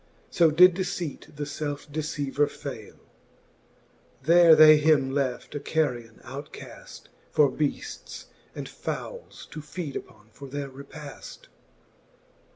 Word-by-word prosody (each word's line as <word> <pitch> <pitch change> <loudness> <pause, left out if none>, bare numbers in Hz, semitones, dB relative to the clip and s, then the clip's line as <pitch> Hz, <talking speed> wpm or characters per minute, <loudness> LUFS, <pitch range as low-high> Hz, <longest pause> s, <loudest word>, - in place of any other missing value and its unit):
So 170 -2 +5
did 180 +4 +7
deceipt 175 -6 -4
the 150 - -4
felfe 145 0 -4
deceiver 145 -1 -1
fayle. 125 -8 -8 1.3
There 170 +2 +7
they 155 -1 +9
him 150 -3 +3
left 135 -3 -2
a 145 - -3
carrion 125 -7 -2
outcaft; - - -10 0.3
For 145 -3 +4
beafles 145 +1 -4 0.3
and - - -5
foules - - -7
to 155 - -7
feede 150 0 -6
upon 105 0 -9
for 140 +5 -11
their 140 +1 -5
repafl. 140 +2 -11
145 Hz, 115 wpm, -26 LUFS, 135-155 Hz, 1.3 s, they